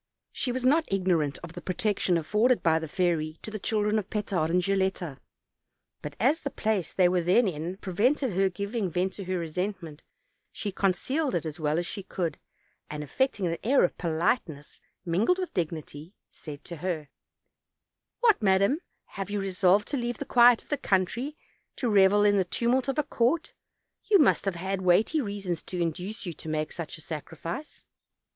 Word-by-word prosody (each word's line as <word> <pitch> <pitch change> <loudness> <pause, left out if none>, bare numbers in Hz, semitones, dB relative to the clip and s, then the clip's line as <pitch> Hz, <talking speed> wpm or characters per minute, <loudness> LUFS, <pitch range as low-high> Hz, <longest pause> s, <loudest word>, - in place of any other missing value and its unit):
She 250 - -2
was 255 0 -2
not 310 +2 +3
ignorant 175 -7 +1
of 170 -1 -8
the 175 - -8
protection 185 -1 0
afforded 215 +10 +2
by 160 -1 +4
the 160 - -5
fairy 160 -2 0
to 215 - -6
the 215 - -5
children 210 +1 +1
of 200 - -7
Petard 195 -7 -1
and 180 +2 +2
Gil 195 +1 +1
letta; 180 -6 -2 0.8
but 150 -1 -7
as 275 - +3
the 280 - -4
place 215 -8 -1
they 185 -2 +4
were 180 0 +2
then 185 +7 +4
in 170 +2 -4
prevented 225 +6 +1
her 190 +1 +2
giving 200 +2 -3
vent 180 +3 -1
to 200 - -7
her 185 0 -1
resentment, 170 -1 -4 0.5
she 205 - -4
concealed 255 - 0
it 170 - -1
as 155 +1 -5
well 150 0 0
as 175 - 0
she 200 - -5
could; 175 -5 -3 0.5
and 150 0 -5
affecting 205 - 0
an 165 -1 -1
air 265 +5 +4
of - - +1
politeness 165 - -1 0.2
mingled 195 - +2
with 370 -1 -4
dignity, 160 0 -4 0.2
said 145 -2 -10
to 170 - -8
her: 160 -4 -3 1.1
"What, 450 - +4
madam, 200 +8 +3 0.3
have 195 -1 -6
you 205 0 -1
resolved 195 +1 +2
to 285 - -1
leave 240 -2 -2
the - - -5
quiet 240 -1 +6
of - - -28
the 290 - 0
country, 245 - 0 0.4
to 250 - -2
revel 205 -1 +5
in 205 -1 +4
the 190 - +3
tumult 240 +8 0
of 270 - -1
a 300 - +3
court? 280 +4 0 0.5
you 415 - +5
must 300 - +3
have 195 -3 0
had 190 +2 -3
weighty 200 - +3
reasons 200 -7 -3
to 180 - -6
induce 180 +7 -3
you 175 - -4
to 160 - -8
make 155 0 -2
such 170 -3 -6
a - - -12
sacrifice." 165 - -7
190 Hz, 185 wpm, -28 LUFS, 170-220 Hz, 1.1 s, quiet